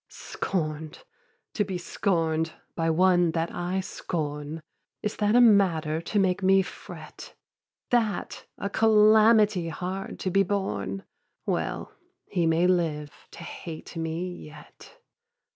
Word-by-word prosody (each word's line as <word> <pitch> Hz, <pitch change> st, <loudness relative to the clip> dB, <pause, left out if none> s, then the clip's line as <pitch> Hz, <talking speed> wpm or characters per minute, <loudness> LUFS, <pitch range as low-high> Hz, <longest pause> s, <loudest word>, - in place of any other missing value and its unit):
Scorn'd, 155 Hz, -4 st, -4 dB, 0.5 s
to 210 Hz, -, +1 dB
be 190 Hz, -2 st, -4 dB
scorn'd 165 Hz, -3 st, 0 dB, 0.2 s
by 165 Hz, -1 st, 0 dB
one 175 Hz, 0 st, +3 dB
that 165 Hz, 0 st, -1 dB
I 180 Hz, +2 st, -2 dB
scorn, 155 Hz, -4 st, -4 dB, 0.4 s
Is 210 Hz, -, -2 dB
that 210 Hz, +1 st, +2 dB
a -, -, +7 dB
matter 175 Hz, -9 st, +4 dB
to 190 Hz, +5 st, -3 dB
make 190 Hz, -1 st, +2 dB
me 190 Hz, 0 st, +5 dB
fret? -, -, -11 dB, 0.6 s
That 225 Hz, -5 st, 0 dB
a -, -, -3 dB
calamity 215 Hz, -3 st, +5 dB
hard 185 Hz, +3 st, -5 dB
to 185 Hz, -, -1 dB
be 195 Hz, -, +4 dB
borne? 195 Hz, 0 st, -2 dB, 0.4 s
Well, -, -, -2 dB, 0.3 s
he 175 Hz, -4 st, 0 dB
may 165 Hz, +2 st, +3 dB
live 160 Hz, -5 st, +1 dB, 0.2 s
to -, -, -9 dB
hate 165 Hz, 0 st, -8 dB
me 165 Hz, +2 st, -3 dB
yet. 155 Hz, -, -12 dB
180 Hz, 125 wpm, -27 LUFS, 160-200 Hz, 0.6 s, a